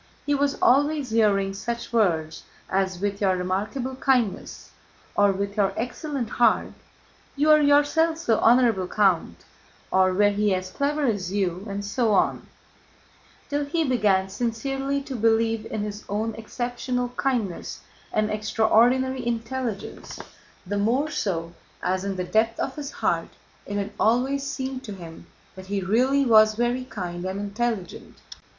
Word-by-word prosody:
He 290 - +1
was 285 0 +1
always 285 0 +3
hearing 200 -3 +2
such 235 +4 -5
words 165 -8 +1 0.3
as: 190 -1 0
"With 200 +1 -2
your 190 -2 +3
remarkable 210 +8 -2
kindness," 255 -6 -1 0.4
or, 205 -1 +4
"With 200 +1 -3
your 195 -2 +2
excellent 250 +2 -3
heart," 230 0 +2 0.6
"You 295 +2 +3
are 305 0 +7
yourself 295 +3 +3
so 235 -9 +1
honorable, 230 -6 +4
Count," 180 - +1 0.5
or, 185 0 +4
"Were 205 +2 +4
he 205 -1 +1
as 185 0 -5
clever 290 +4 0
as 200 -7 -1
you," 190 0 -2
and 200 +1 -4
so 220 +2 +1
on, - - +1 1.0
till 290 0 -1
he 320 +3 0
began 210 -8 +2
sincerely 270 +6 -2
to 270 - -6
believe 225 0 +1
in 210 - -3
his 210 0 -6
own 215 +3 -1
exceptional 245 +2 -3
kindness 245 -7 -2 0.3
and 215 0 0
extraordinary 230 +5 +2
intelligence, 235 -2 -4 0.5
the 200 +2 -2
more 255 +9 +1
so 170 - -2 0.3
as 185 +1 0
in 195 -1 -3
the 180 - -2
depth 220 +5 +1
of 265 - -2
his 290 -2 -5
heart - - -1 0.4
it 205 - -3
had 200 +1 -3
always 255 +5 +2
seemed 265 -2 -4
to 210 - -6
him 170 -4 -11 0.3
that 190 0 -11
he 200 0 -1
really 255 +9 +2
was 215 -2 +6
very 240 +2 0
kind 175 -7 -6
and 190 +1 -3
intelligent. 205 -2 -4
220 Hz, 145 wpm, -25 LUFS, 195-260 Hz, 1.0 s, are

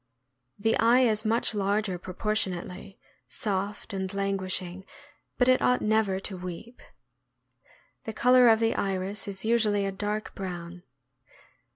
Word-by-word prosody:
The 225 +2 +1
eye 235 +3 +5
is 220 -3 +1
much 230 +1 +2
larger 200 -2 0
proportionately, 190 -1 -3 0.3
soft 200 - -3
and 190 -1 -3
languishing; 190 -2 -2 0.5
but 250 - +3
it 255 0 +4
ought 250 - +2
never 215 -3 +1
to 195 -1 -6
weep. 180 +7 -8 1.2
The 220 - -4
color 250 +2 +5
of 220 -1 +5
the 225 0 +2
iris 195 +1 -2
is 195 +1 -5
usually 215 -3 +2
a 195 - -1
dark 210 +2 -4
brown. 175 -2 -7
200 Hz, 130 wpm, -27 LUFS, 190-220 Hz, 1.2 s, eye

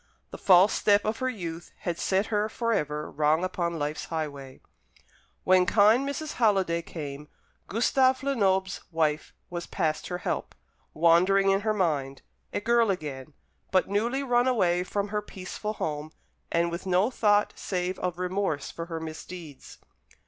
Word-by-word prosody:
The - - -7
false 190 +1 +6
step 205 -1 +3
of 215 +1 -1
her 260 0 0
youth 170 -7 -6
had 170 -1 -3
set 190 +2 +1
her 210 +1 +1
for 230 +1 -1
ever 150 -5 -2
wrong 155 +3 +2
upon 170 -2 -2
life's 150 0 -3
highway. 140 -5 -5 0.8
When 185 -1 +4
kind 225 +7 +4
Mrs. 305 +2 -4
Halliday 195 -7 +2
came, 150 -3 -7 0.4
Gustave 260 +4 +2
Lenoble's 195 -8 +1
wife 155 -2 0 0.2
was 175 -1 -5
past 155 -1 -1
her 180 - -3
help; - - -3 0.4
wandering 185 +4 +4
in 195 - +3
her 215 0 +1
mind; 145 -8 -1 0.3
a - - -1
girl 235 0 +3
again, 150 -6 -4 0.4
but 185 0 +2
newly 235 +7 0
run 245 -1 +2
away 180 -8 +2
from 200 +2 -2
her 210 0 -1
peaceful 210 +1 -6
home; 155 -5 -4 0.4
and 170 0 +1
with 170 +3 -5
no 185 +6 +2
thought 210 -3 +2
save 180 -1 -3
of 180 -1 -2
remorse 180 -5 -2
for 165 0 -6
her 165 -1 -4
misdeeds. 160 -1 -9
185 Hz, 155 wpm, -27 LUFS, 160-210 Hz, 0.8 s, false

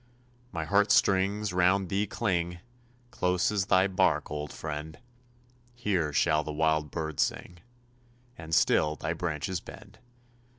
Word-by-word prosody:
My 80 -3 -3
heart 100 +4 +3
strings 100 +1 +2
round 90 +1 +2
thee 100 +3 0
cling, 90 -5 -1 0.5
Close 90 +2 +1
as 100 -3 -1
thy 95 +1 +4
bark, 95 -7 +1
old 75 -1 -4
friend! 75 0 -6 0.8
Here 95 -10 -1
shall 75 +2 +2
the 75 - -5
wild 80 0 +1
bird 80 +1 -5
sing, 90 -1 -2 0.8
And 80 0 -3
still 75 0 +3
thy - - -3
branches 85 +2 -3
bend. - - -13
90 Hz, 130 wpm, -28 LUFS, 80-95 Hz, 0.8 s, thy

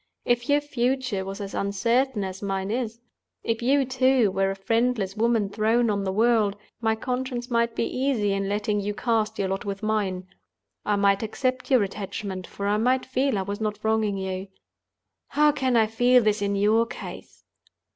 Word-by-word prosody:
If 240 +1 0
your 290 +1 +4
future 255 -6 -1
was 195 +2 -6
as 200 -1 -6
uncertain 230 +4 0
as 190 0 -6
mine 195 0 -2
is—if 230 -1 -5
you, 270 +3 +3
too, 260 -4 +3
were 195 0 +1
a 195 - -2
friendless 225 -1 0
woman 225 -1 +2
thrown 220 +3 +1
on 200 -1 -1
the 190 - 0
world—my 220 0 +1
conscience 250 +1 -3
might 235 0 +1
be - - 0
easy 255 -7 0
in 195 0 -1
letting 205 0 0
you 205 +1 -3
cast 220 -1 0
your 195 -1 -1
lot 195 +1 -2
with 200 0 -5
mine. 200 -4 -1 0.6
I 210 - +3
might 200 -1 +3
accept 255 +3 -2
your 255 -6 +5
attachment, 195 -1 -5
for 200 - -6
I 205 +1 +2
might 255 +4 +2
feel 260 -2 0
I 190 - -1
was 200 +2 -5
not 210 -1 -1
wronging 220 -2 +1
you. 190 0 -4 0.8
How 300 +1 +4
can 260 -4 0
I 220 - +5
feel 245 +3 +4
this 210 -1 +1
in 200 0 0
your 215 +3 +3
case? - - -9
220 Hz, 175 wpm, -25 LUFS, 200-245 Hz, 0.8 s, your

